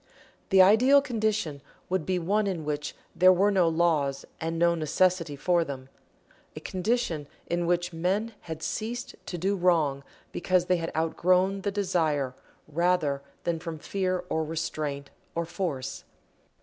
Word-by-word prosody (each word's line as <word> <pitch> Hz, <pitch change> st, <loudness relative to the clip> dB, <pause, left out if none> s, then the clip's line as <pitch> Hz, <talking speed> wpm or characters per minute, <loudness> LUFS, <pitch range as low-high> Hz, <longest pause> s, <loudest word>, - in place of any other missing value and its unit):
The 190 Hz, -1 st, +7 dB
ideal 245 Hz, +9 st, +6 dB
condition 215 Hz, -, -1 dB, 0.3 s
would 185 Hz, -4 st, -1 dB
be 185 Hz, -1 st, +1 dB
one 200 Hz, +5 st, +1 dB
in 170 Hz, -5 st, -3 dB
which 150 Hz, 0 st, -3 dB, 0.2 s
there 185 Hz, +1 st, +7 dB
were 195 Hz, +3 st, +3 dB
no 185 Hz, -4 st, +3 dB
laws 160 Hz, -5 st, +1 dB
and 165 Hz, +1 st, -2 dB
no 170 Hz, +1 st, +4 dB
necessity 165 Hz, 0 st, +1 dB
for 175 Hz, +4 st, +2 dB
them 135 Hz, -3 st, -7 dB, 0.7 s
a -, -, -5 dB
condition 185 Hz, -6 st, -1 dB, 0.2 s
in 170 Hz, 0 st, -1 dB
which 175 Hz, 0 st, 0 dB
men 195 Hz, +7 st, -1 dB, 0.2 s
had 160 Hz, 0 st, -5 dB
ceased 235 Hz, +3 st, -3 dB
to 175 Hz, -, -4 dB
do 195 Hz, +4 st, 0 dB
wrong 160 Hz, -7 st, +2 dB, 0.3 s
because 180 Hz, 0 st, +1 dB
they 180 Hz, 0 st, +2 dB
had 165 Hz, -1 st, -3 dB
outgrown 185 Hz, +4 st, +2 dB
the 200 Hz, -, -1 dB
desire 160 Hz, -9 st, 0 dB, 0.3 s
rather 155 Hz, -3 st, +1 dB, 0.2 s
than 170 Hz, -1 st, -1 dB
from 165 Hz, -1 st, -6 dB
fear 185 Hz, +2 st, -2 dB
or 160 Hz, -, 0 dB
restraint 150 Hz, -3 st, -4 dB, 0.2 s
or 170 Hz, 0 st, -1 dB
force. 145 Hz, -8 st, -4 dB
175 Hz, 150 wpm, -27 LUFS, 155-190 Hz, 0.7 s, The